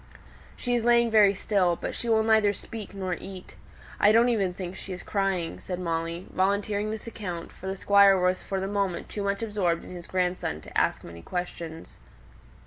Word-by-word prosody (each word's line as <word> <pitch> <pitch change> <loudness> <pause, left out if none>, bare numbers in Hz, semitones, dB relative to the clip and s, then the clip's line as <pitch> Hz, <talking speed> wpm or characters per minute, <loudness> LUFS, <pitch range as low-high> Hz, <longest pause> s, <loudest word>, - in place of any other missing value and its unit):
"She 245 - -2
is 240 -2 +1
lying 235 -1 +4
very 205 -2 +6
still, 185 -3 +2
but - - -5
she 235 - -4
will 220 -1 +4
neither 220 -2 +4
speak 210 -1 -8
nor 190 -2 -2
eat. 185 +1 -8 0.4
I 205 - +6
don't 230 +2 +5
even 200 -6 +1
think 180 0 -6
she 190 0 -7
is 180 - -8
crying," 195 -4 -1
said 180 -1 -5
Molly, 165 0 -2
volunteering 200 +2 0
this 220 0 -5
account, 185 -7 -6
for 190 - -10
the 190 - -2
Squire 200 -1 +5
was 180 0 +1
for 195 - -3
the 190 - -2
moment 195 -3 -2
too 210 - -4
much 200 +2 -1
absorbed 195 -6 0
in - - -10
his 175 -1 -9
grandson 180 - -1
to - - -13
ask - - +1
many 85 0 -10
questions. 170 - -6
195 Hz, 195 wpm, -27 LUFS, 180-210 Hz, 0.4 s, very